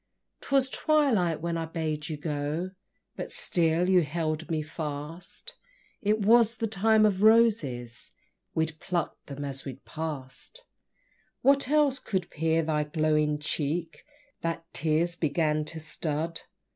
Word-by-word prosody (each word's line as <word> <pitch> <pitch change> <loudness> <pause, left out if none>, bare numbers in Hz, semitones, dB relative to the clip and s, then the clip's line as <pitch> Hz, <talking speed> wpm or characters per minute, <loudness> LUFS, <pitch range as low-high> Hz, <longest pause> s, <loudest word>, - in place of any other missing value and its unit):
'Twas 270 -1 +2
twilight, 230 - +2
and 170 -1 -1
I 165 - -2
bade 155 -2 -3
you 155 - -3
go, 150 +4 -2 0.4
But - - -6
still 175 - +2
you 185 -1 +5
held 155 +1 -2
me 155 -2 0
fast; 155 - -6 0.5
It 210 0 +1
was 230 +1 +5
the 225 - -2
Time 220 +1 +3
of 200 -2 +1
Roses, 205 - +3 0.5
We 160 - +3
pluck'd 165 +2 -4
them 145 0 -5
as 135 -1 -5
we 135 -3 -6
pass'd. 155 - -6 0.8
What 275 -1 +4
else 290 -2 +3
could 185 -4 -3
peer 160 +1 +1
thy 155 -1 +1
glowing 150 -1 +1
cheek, 155 +2 -2 0.4
That 165 0 -2
tears 160 +3 +1
began 155 -1 +1
to 160 +1 -6
stud? 155 +1 -3
165 Hz, 135 wpm, -28 LUFS, 150-200 Hz, 0.8 s, you